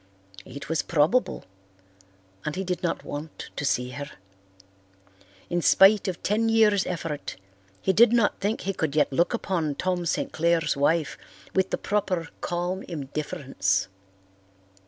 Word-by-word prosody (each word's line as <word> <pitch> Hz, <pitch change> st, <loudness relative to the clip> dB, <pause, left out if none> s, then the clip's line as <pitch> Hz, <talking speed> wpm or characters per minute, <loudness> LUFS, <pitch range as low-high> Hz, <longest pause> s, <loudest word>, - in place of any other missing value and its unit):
It 140 Hz, +3 st, -8 dB
was 160 Hz, 0 st, 0 dB
probable, 170 Hz, +11 st, +1 dB, 1.0 s
and 155 Hz, -, -3 dB
he 190 Hz, -, -2 dB
did 180 Hz, -2 st, -3 dB
not 170 Hz, -, -2 dB
want 150 Hz, +2 st, -7 dB
to -, -, -4 dB
see 125 Hz, -2 st, 0 dB
her. 145 Hz, +3 st, -6 dB, 1.4 s
In 175 Hz, 0 st, -1 dB
spite 195 Hz, +4 st, +6 dB
of 180 Hz, -3 st, -4 dB
ten 225 Hz, +3 st, +1 dB
years' 215 Hz, -3 st, +4 dB
effort, 165 Hz, -4 st, -4 dB, 0.5 s
he 190 Hz, -, +2 dB
did 230 Hz, +4 st, +6 dB
not 235 Hz, -3 st, +2 dB
think 205 Hz, +3 st, -1 dB
he 195 Hz, -, -2 dB
could 155 Hz, -5 st, -2 dB
yet 145 Hz, -2 st, +2 dB
look 170 Hz, -, +2 dB
upon 170 Hz, -10 st, -1 dB
Tom 180 Hz, 0 st, -1 dB
St. -, -, -1 dB
Clair's 165 Hz, -1 st, +1 dB
wife 145 Hz, +1 st, +1 dB, 0.3 s
with 190 Hz, 0 st, +2 dB
the -, -, -1 dB
proper 185 Hz, -5 st, -1 dB
calm 175 Hz, +2 st, -2 dB
indifference. 140 Hz, -, -2 dB
170 Hz, 140 wpm, -26 LUFS, 150-190 Hz, 1.4 s, spite